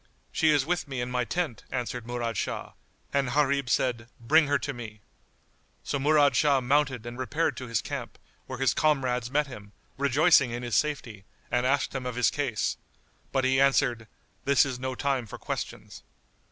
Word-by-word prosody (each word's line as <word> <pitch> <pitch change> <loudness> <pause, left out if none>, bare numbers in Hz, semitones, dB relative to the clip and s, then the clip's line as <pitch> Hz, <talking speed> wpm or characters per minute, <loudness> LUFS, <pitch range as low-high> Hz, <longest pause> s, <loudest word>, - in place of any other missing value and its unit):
"She 160 - +2
is 145 -3 +3
with 175 -1 -1
me 135 -2 -4
in 120 +1 -3
my 125 -1 0
tent," 160 - -2
answered 125 -2 -4
Murad 120 -2 -3
Shah; - - -3 0.4
and 140 -2 +1
Gharib 140 -3 +2
said, 120 -2 0
"Bring 150 +6 +4
her 145 0 +3
to 145 - -4
me." 110 -4 -9 0.8
So 140 - -2
Murad 145 0 +4
Shah 145 -3 +4
mounted 130 -2 +1
and 120 +1 -7
repaired 150 +6 0
to 130 - -6
his 115 -2 -1
camp, - - -6 0.3
where 130 - -5
his 135 -2 +2
comrades 130 -6 +1
met 145 +3 +1
him, 105 -7 -11 0.3
rejoicing 140 0 +4
in 120 +1 -5
his 120 -3 -2
safety, 125 -9 -1 0.3
and 125 +1 +2
asked 140 +1 +1
him 130 -2 -3
of 125 - -4
his 125 -1 +3
case; 135 -7 -1 0.5
but 135 - +1
he 130 +1 +3
answered, 125 -4 +2 0.4
"This 140 0 +4
is 130 -3 -4
no 130 0 -3
time 135 -4 -1
for - - -8
questions." - - -6
130 Hz, 180 wpm, -27 LUFS, 120-140 Hz, 0.8 s, Bring